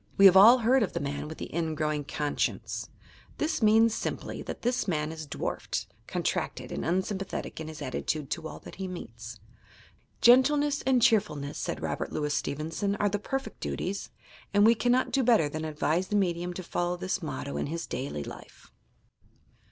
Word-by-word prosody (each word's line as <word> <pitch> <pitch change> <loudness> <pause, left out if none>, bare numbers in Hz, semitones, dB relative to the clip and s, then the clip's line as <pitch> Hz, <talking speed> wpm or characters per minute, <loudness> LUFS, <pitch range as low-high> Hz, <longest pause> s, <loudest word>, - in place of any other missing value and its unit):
We 195 - +7
have 190 -1 +9
all 220 +6 +9
heard 250 +2 +3
of 205 - 0
the - - -1
man 145 +1 -3
with 160 - -8
the - - -7
"ingrowing 155 -3 -1
conscience." 145 0 -2 0.5
This 310 -2 -1
means, 220 +1 +5
simply, - - -4
that - - -7
this 245 -2 0
man 155 -3 0
is 160 -1 -7
dwarfed, - - -3 0.2
contracted - - -2
and - - -3
unsympathetic 190 +2 -2
in 160 - -5
his 155 -1 -7
attitude 140 +2 -3
to 165 -2 -2
ail - - -8
that - - -11
he 190 -1 -4
meets. 115 - -8 0.8
"Gentleness 285 +4 +5
and 255 -3 +4
cheer 220 -3 +6
fulness," 145 -3 -7
said - - -3
Robert - - -2
Louis 150 -1 -1
Stevenson, 160 +10 -2
"are 205 0 +1
the 205 +1 -1
perfect 270 +5 -4
duties"; 195 +2 -3 0.5
and 205 +1 +6
we 230 - +7
cannot 245 +3 +2
do 275 - +2
better 230 - +4
than 155 +2 -4
advise 155 +4 0
the 210 - -2
medium 175 -3 0
to 185 - -5
follow 175 +1 -1
this 190 +1 -2
motto 140 -3 -4
in - - -2
his 165 +3 -4
daily 130 - -4
life. - - -12
180 Hz, 180 wpm, -28 LUFS, 150-220 Hz, 0.8 s, have